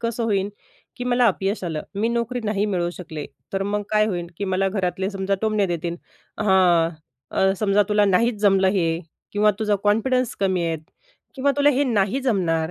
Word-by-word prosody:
कसं 230 0 -2
होईल 200 -2 0 0.5
की 245 - -5
मला 245 0 +3
अपयश 195 0 0
आलं, 160 -3 -3
मी 210 +3 0
नोकरी 235 +1 -1
नाही 210 -1 0
मिळवू 175 -4 -1
शकले, 160 -5 -7 0.3
तर 195 0 0
मग 205 +1 -1
काय 215 0 +3
होईल 175 -5 -3
की 200 - -2
मला 190 0 +1
घरातले 190 0 -2
समजा 195 0 -1
टोमणे 215 -2 +2
देतील 170 -1 -3 0.4
हं, 185 -5 +4 0.7
समजा 205 -1 +3
तुला 210 0 +3
नाहीच 215 +4 +2
जमलं 195 -2 +4
हे 170 -3 +2 0.5
किंवा 210 +1 +4
तुझा 210 -2 +1
कॉन्फिडन्स 240 +4 +2
कमी 185 -3 +1
आहे 165 -1 -1 0.6
किंवा 280 +1 +1
तुला 290 0 +5
हे 285 +1 +1
नाही 215 +1 +1
जमणार. 175 -10 0
200 Hz, 175 wpm, -23 LUFS, 185-220 Hz, 0.7 s, तुला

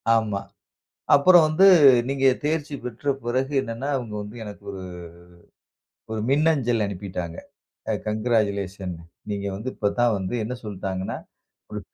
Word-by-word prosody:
ஆமா. 110 -3 0 0.8
அப்புறம் 175 +4 +7
வந்து, 155 +6 +5 0.4
நீங்க 135 0 +1 0.2
தேர்ச்சி 150 -1 -1
பெற்ற 125 +4 -3
பிறகு 130 +4 -1
என்னானா, 115 +2 -5
அவுங்க 120 -5 -5
வந்து 105 +3 -10
எனக்கு 105 -1 -10
ஒரு, 95 -1 -7 1.3
ஒரு 110 -1 -2
மின்னஞ்சல் 135 -7 +2
அனுப்பிட்டாங்க. 90 -4 -5 0.5
அ, - - +2 0.2
கங்கிராசுலேஷன் 100 -4 -1 0.4
நீங்க 100 -1 -3
வந்து 110 +6 -4
இப்ப 105 - 0
தான் 120 -1 +4
வந்து 95 +4 -3
என்ன 115 +4 -4
சொல்ட்டாங்கனா, 95 -2 -4 0.5
ஒரு - - -4
110 Hz, 125 wpm, -24 LUFS, 100-135 Hz, 1.3 s, அப்புறம்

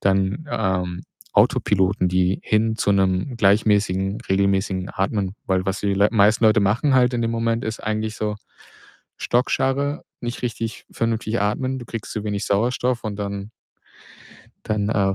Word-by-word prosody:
dann, 95 +9 +1
ähm, 90 -2 -1 0.3
Autopiloten, 95 -2 +2
die 90 +1 +1
hin 110 +1 +1
zu 100 - +1
'nem 95 +5 +1
gleichmäßigen, 100 -1 +2
regelmäßigen 95 -1 +1
Atmen, 100 0 -1
weil 95 -1 +1
was 95 +2 -1
die 100 -1 0
L 100 +2 +3
meisten 110 +1 +4
Leute 110 -1 +5
machen 110 +8 +2
halt 125 -1 +4
in 120 - 0
dem 115 - 0
Moment, 115 0 -1
ist 110 0 -4
eigentlich 110 0 -2
so 105 -1 -2 0.8
Schockstarre, 135 +4 0 0.2
nicht 120 +1 -5
richtig 115 -2 -4
vernünftig 115 -1 -1
atmen. 130 +6 -1
Du 120 - -9
kriegst 115 -2 -6
zu 110 -1 -4
wenig 105 -1 -2
Sauerstoff 120 +3 0
und 105 -2 -3
dann 100 0 -4 1.2
dann, 105 -1 0
äh, 100 -3 +1
105 Hz, 150 wpm, -22 LUFS, 95-115 Hz, 1.2 s, Leute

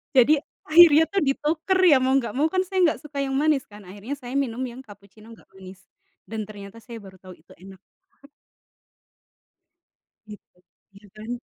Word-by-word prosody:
Jadi, 280 +4 +5 0.3
akhirnya 320 -1 +7
tuh 400 - 0
dituker 300 +6 -1 0.2
ya 275 - +5
mau 260 +1 +1
nggak 250 -5 -1
mau 285 +7 0
kan 370 +3 -1
saya 375 0 -4
nggak 310 - -2
suka 295 -1 -7
yang 270 -1 -3
manis 295 -2 0
kan 210 0 -14
akhirnya 205 +9 -8
saya 250 -3 -10
minum 255 -2 -3
yang 245 0 -9
kapucino 205 -2 -17
nggak - - -25
manis, 190 0 -14 0.4
dan 215 -1 -6
ternyata 205 +1 -12
saya 230 +1 -11
baru 190 -1 -15
tahu 185 -1 -13
itu 155 - -25
enak. 190 +1 -14 2.5
Gitu, 210 -3 -15 0.4
iya 205 +1 -17
kan. 215 +2 -11
245 Hz, 170 wpm, -23 LUFS, 205-290 Hz, 2.5 s, akhirnya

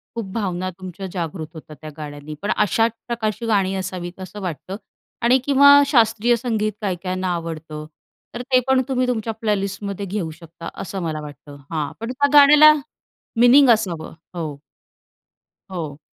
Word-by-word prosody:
खूप 230 - -3
भावना 185 -4 -2
तुमच्या 185 +1 -8
जागृत 165 -2 -4
होतात 155 -1 -11
त्या 155 - -7
गाण्यांनी. 150 0 -8
पण 205 - -1
अशाच 225 +2 +2 0.2
प्रकारची 230 -1 -2
गाणी 195 -4 +1
असावीत 185 -1 -5
असं 190 +3 -8
वाटतं 185 +1 -5 0.5
आणि 245 +3 +5
किंवा 285 0 +7
शास्त्रीय 235 -2 +3
संगीत 220 -3 -1
काही 190 -3 -1
काहींना 185 0 -2
आवडतं, 160 -2 -6 0.5
तर 240 - -5
ते 255 - +6
पण 265 0 +4
तुम्ही 255 -1 0
तुमच्या 225 -2 -2
प्लेलिस्टमध्ये 200 -2 -3
घेऊ 185 -4 -3
शकता 165 +1 -10
असं 195 +1 -5
मला 155 -2 -3
वाटतं. 145 -1 -11
हां, 150 -2 -2
पण 230 +2 -4
त्या 285 +2 +1
गाण्याला 300 +2 +9 0.7
मीनिंग 255 +3 +7
असावं, 190 -9 +1 0.2
हो. 155 -4 -4 1.1
हो. 155 -6 -5
195 Hz, 150 wpm, -21 LUFS, 165-230 Hz, 1.1 s, गाण्याला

